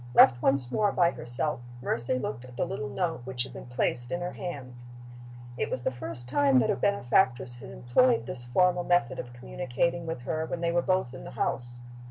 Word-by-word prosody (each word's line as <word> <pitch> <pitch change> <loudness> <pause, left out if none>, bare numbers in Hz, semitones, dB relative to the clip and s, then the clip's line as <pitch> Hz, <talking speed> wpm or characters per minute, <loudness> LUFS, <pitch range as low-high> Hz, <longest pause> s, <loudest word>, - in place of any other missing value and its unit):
Left 120 -1 +7
once 135 -2 +2
more 205 +4 +2
by 175 -3 +3
herself, 120 +2 -2 0.2
Mercy 120 +1 0
looked 120 -1 -4
at 125 -1 -12
the - - +1
little 140 0 -4
note 165 0 -2
which 125 -1 -1
had 130 0 -9
been - - -9
placed 125 0 -1
in 175 - -1
her 175 0 -3
hands. 125 -8 -7 0.7
It - - 0
was 120 - -3
the - - +1
first 120 -1 +1
time 140 0 +3
that 125 - +3
her - - +1
benefactress 130 -8 +1
had - - -10
employed 230 - +2
this 120 -1 0
formal 180 +8 +2
method 175 -9 +1
of 120 - -6
communicating 135 +7 -2
with 165 -6 -4
her 155 +5 -2
when 170 - -4
they 170 0 +1
were 175 0 +2
both 185 -9 0
in 130 - -9
the - - -8
house. 120 -1 -2
130 Hz, 210 wpm, -28 LUFS, 120-170 Hz, 0.7 s, Left